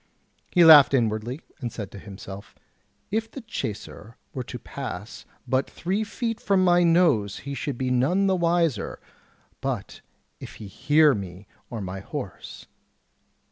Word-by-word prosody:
He 175 Hz, -2 st, +6 dB
laughed 145 Hz, -4 st, +9 dB
inwardly, 115 Hz, +3 st, -1 dB, 0.2 s
and 120 Hz, -5 st, -4 dB
said 105 Hz, -4 st, -6 dB
to 100 Hz, -, -9 dB
himself: 100 Hz, 0 st, -10 dB, 0.6 s
"If 225 Hz, +2 st, -1 dB
the 270 Hz, -, -8 dB
chacer 115 Hz, -, -6 dB, 0.2 s
were 130 Hz, -, -3 dB
to -, -, -6 dB
pass -, -, -7 dB, 0.2 s
but 130 Hz, +1 st, +1 dB
three 195 Hz, +5 st, -2 dB
feet 225 Hz, +1 st, -3 dB
from 195 Hz, -2 st, +3 dB
my 175 Hz, -1 st, +5 dB
nose 165 Hz, -, +3 dB
he 140 Hz, -, -4 dB
should 140 Hz, -2 st, -3 dB
be 130 Hz, 0 st, -1 dB
none 150 Hz, +11 st, +2 dB
the 190 Hz, -1 st, +3 dB
wiser 170 Hz, -, 0 dB, 0.6 s
but -, -, -4 dB, 0.4 s
if -, -, -9 dB
he 110 Hz, -, -9 dB
hear 150 Hz, +9 st, +4 dB
me 95 Hz, -2 st, -6 dB, 0.2 s
or 115 Hz, -3 st, -5 dB
my 95 Hz, 0 st, -5 dB
horse." 100 Hz, -, -7 dB
135 Hz, 145 wpm, -25 LUFS, 105-175 Hz, 0.6 s, laughed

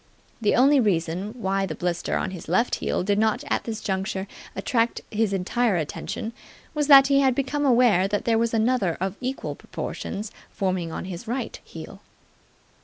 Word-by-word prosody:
The 210 Hz, -, +3 dB
only 275 Hz, +3 st, +5 dB
reason 190 Hz, 0 st, 0 dB
why 195 Hz, -2 st, 0 dB
the 155 Hz, -, -5 dB
blister 175 Hz, 0 st, -1 dB
on -, -, -2 dB
his 180 Hz, -3 st, -8 dB
left 210 Hz, +8 st, +2 dB
heel -, -, 0 dB
did 200 Hz, +2 st, +1 dB
not 220 Hz, -1 st, +1 dB
at -, -, 0 dB
this 225 Hz, -2 st, -4 dB
juncture 190 Hz, 0 st, -2 dB, 0.3 s
attract 230 Hz, +4 st, 0 dB
his 220 Hz, -1 st, +1 dB
entire 200 Hz, +3 st, +1 dB
attention 175 Hz, +7 st, -4 dB, 0.4 s
was 300 Hz, -2 st, 0 dB
that 275 Hz, -2 st, +9 dB
he 275 Hz, 0 st, +4 dB
had 265 Hz, -2 st, +3 dB
become 285 Hz, +2 st, 0 dB
aware 235 Hz, -7 st, +4 dB
that 205 Hz, +1 st, -2 dB
there 225 Hz, -1 st, +3 dB
was 230 Hz, 0 st, +1 dB
another 225 Hz, -6 st, +1 dB
of 190 Hz, +1 st, -2 dB
equal 260 Hz, +1 st, -3 dB
proportions 210 Hz, +1 st, -6 dB, 0.2 s
forming 185 Hz, -4 st, -2 dB
on -, -, -5 dB
his 185 Hz, +3 st, -7 dB
right 250 Hz, +3 st, -3 dB
heel. -, -, -10 dB
210 Hz, 175 wpm, -25 LUFS, 190-245 Hz, 0.4 s, that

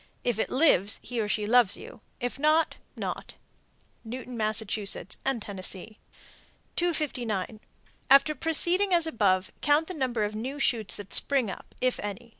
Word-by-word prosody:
If 240 Hz, -3 st, -1 dB
it -, -, -1 dB
lives, 230 Hz, -, +3 dB
he 240 Hz, -2 st, -3 dB
or 210 Hz, -, -2 dB
she 210 Hz, 0 st, -1 dB
loves 235 Hz, -2 st, +4 dB
you; -, -, -12 dB, 0.2 s
if 245 Hz, +1 st, -4 dB
not, 310 Hz, +2 st, +2 dB, 0.2 s
not. -, -, -6 dB, 0.7 s
Newton, 245 Hz, +2 st, -7 dB
Mass., 215 Hz, -1 st, +1 dB
and 220 Hz, +4 st, -1 dB
Tennessee. 200 Hz, +2 st, -2 dB, 0.8 s
259. 245 Hz, -, -2 dB, 0.5 s
After 275 Hz, +3 st, +6 dB
proceeding 350 Hz, +5 st, +3 dB
as 340 Hz, -1 st, +3 dB
above, 200 Hz, -, +1 dB
count 295 Hz, +2 st, +3 dB
the 370 Hz, -, -5 dB
number 255 Hz, -8 st, -1 dB
of 210 Hz, 0 st, -2 dB
new 250 Hz, +7 st, -5 dB
shoots 230 Hz, -9 st, 0 dB
that 205 Hz, -1 st, -9 dB
spring 265 Hz, -8 st, +4 dB
up -, -, -12 dB
(if 255 Hz, 0 st, 0 dB
any). 205 Hz, +3 st, -6 dB
240 Hz, 150 wpm, -27 LUFS, 210-285 Hz, 0.8 s, After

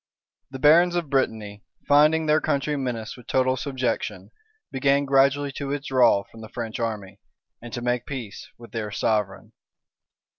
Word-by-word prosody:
The 135 Hz, -, -7 dB
barons 170 Hz, +5 st, +5 dB
of 170 Hz, -5 st, -2 dB
Brittany, 110 Hz, -6 st, -1 dB, 0.2 s
finding 155 Hz, +2 st, +4 dB
their 155 Hz, 0 st, +3 dB
country 150 Hz, 0 st, -1 dB
menaced 125 Hz, -5 st, -4 dB
with 125 Hz, -, -15 dB
total 130 Hz, 0 st, +2 dB
subjection, 130 Hz, -1 st, -3 dB, 0.4 s
began 140 Hz, +1 st, +2 dB
gradually 140 Hz, +1 st, +2 dB
to 140 Hz, -, -4 dB
withdraw 130 Hz, -7 st, +2 dB
from 115 Hz, -, -15 dB
the 110 Hz, -, -10 dB
French 115 Hz, -2 st, -5 dB
army, 105 Hz, -4 st, -4 dB, 0.4 s
and 120 Hz, 0 st, -9 dB
to 120 Hz, 0 st, -5 dB
make 125 Hz, 0 st, -1 dB
peace 115 Hz, -4 st, -7 dB
with 120 Hz, 0 st, -14 dB
their 110 Hz, -2 st, -4 dB
sovereign. 105 Hz, -1 st, -2 dB
130 Hz, 150 wpm, -24 LUFS, 115-140 Hz, 0.4 s, barons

